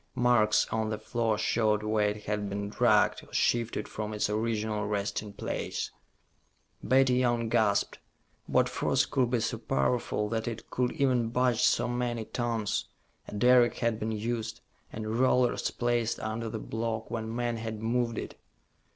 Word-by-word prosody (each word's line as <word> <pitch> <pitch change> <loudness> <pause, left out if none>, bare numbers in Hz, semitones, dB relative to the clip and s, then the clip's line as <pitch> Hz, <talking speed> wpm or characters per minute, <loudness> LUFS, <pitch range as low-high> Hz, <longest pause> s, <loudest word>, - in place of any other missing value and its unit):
Marks 120 -4 +3
on 110 -1 -1
the 110 - -2
floor 115 -2 -1
showed 110 -1 +1
where 105 -1 +2
it 105 0 -5
had 105 -1 -2
been 100 +1 -3
dragged 110 -1 +3
or - - -17
shifted 115 -2 0
from 110 0 -5
its 105 0 0
original 110 -1 -1
resting 105 0 -2
place. 100 - -4 0.9
Betty 130 -1 +3
Young 120 -2 +1
gasped. 110 -4 +1 0.5
What - - +3
force - - +1
could 125 -3 +1
be 120 -2 +1
so 115 - -2
powerful 105 - 0
that 110 0 -2
it 115 -1 -6
could 125 -1 0
even 125 -4 +1
budge 125 0 +1
so - - +3
many 120 -2 -2
tons? 115 -3 -1 0.4
A - - -7
derrick 125 +2 +5
had 115 -2 0
been 110 0 -2
used, 110 +1 -3 0.3
and 110 +1 -3
rollers 125 -1 +2
placed 120 -1 0
under 110 +1 -3
the 110 - -4
block 110 +1 -4
when 115 -1 -3
men 120 -1 -1
had 110 -1 -5
moved 115 0 0
it. - - -6
115 Hz, 160 wpm, -29 LUFS, 105-120 Hz, 0.9 s, derrick